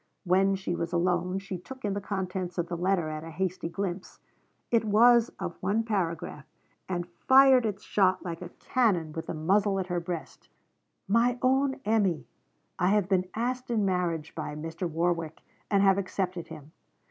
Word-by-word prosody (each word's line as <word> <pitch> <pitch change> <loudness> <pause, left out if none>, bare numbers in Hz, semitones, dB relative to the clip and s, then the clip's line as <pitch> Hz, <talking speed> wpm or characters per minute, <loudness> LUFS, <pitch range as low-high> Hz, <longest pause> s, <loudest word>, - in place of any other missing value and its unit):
When 190 +2 +3
she 190 -2 -3
was 170 -1 -3
alone 180 +1 +1
she 195 -2 -5
took 260 +6 -9
in 200 - 0
the 200 - -3
contents 185 -3 -4
of 175 -1 -1
the 175 - -2
letter 180 -1 +1
at 155 0 -5
a 165 - -8
hasty 180 0 -3
glimpse. 185 0 -4 0.5
It 230 -1 +3
was 230 +2 +5
of 170 - -5
one 205 +5 +1
paragraph, 170 -8 -3 0.4
and 175 -1 -2
fired 260 +6 +5
its 205 -2 -5
shot 185 -2 +2
like 170 -1 -5
a 180 - -7
cannon 180 -10 0
with 160 - -5
the - - -3
muzzle 195 +5 +2
at 190 - -2
her 175 - +1
breast: 170 -1 -7 0.6
'MY 235 +4 +3
OWN 265 +1 +2
EMMY, 205 -7 +1 0.5
I 180 - +3
have 205 -1 +3
been 185 -2 +1
asked 250 +3 -2
in 220 -4 +1
marriage 175 -4 -1
by 150 -2 -5
Mr. 165 +3 -4
Warwick, 165 -1 -1 0.3
and 200 -1 +3
have 195 0 +5
accepted 185 -2 -3
him. 155 -2 -11
185 Hz, 175 wpm, -28 LUFS, 170-205 Hz, 0.6 s, was